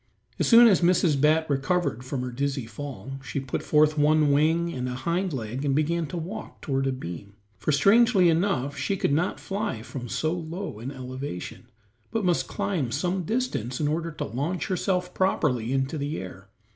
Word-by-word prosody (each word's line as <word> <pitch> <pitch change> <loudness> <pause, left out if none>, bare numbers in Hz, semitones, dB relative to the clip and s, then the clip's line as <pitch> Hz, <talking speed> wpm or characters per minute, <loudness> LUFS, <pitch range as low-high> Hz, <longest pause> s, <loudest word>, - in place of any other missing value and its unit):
As - - +2
soon 235 0 +9
as 195 -5 +4
Mrs. 170 -5 +3
Bat 160 +2 +3
recovered 135 -2 0
from 130 0 -3
her 125 - -4
dizzy 135 0 -2
fall, 135 0 -7
she 140 - -3
put 135 -1 -3
forth 155 0 +3
one 150 0 +4
wing 165 +4 +2
and 125 0 -3
a 125 - -4
hind 170 +8 -1
leg 125 0 -4
and 140 -2 +1
began 160 +2 +1
to 175 - -5
walk 190 +7 -6
toward 135 -1 -1
a - - +1
beam, 100 -5 -7 0.2
for - - 0
strangely 200 - +5
enough 160 -5 +1
she 145 +9 -1
could 140 - +1
not 170 +5 0
fly 195 - -3
from 120 -1 -7
so 155 +6 0
low 170 - -5
an 120 +4 -5
elevation, 130 -7 -7 0.4
but 225 -3 -1
must 175 -2 +1
climb 155 -12 -2
some 175 +6 -1
distance 185 - -2
in 150 - +1
order 165 +2 -1
to 150 - -4
launch 145 - -3
herself 180 -1 -1
properly 130 -11 +1
into 135 +3 -1
the 145 +3 -2
air. 95 +1 -9
150 Hz, 185 wpm, -26 LUFS, 130-175 Hz, 0.4 s, soon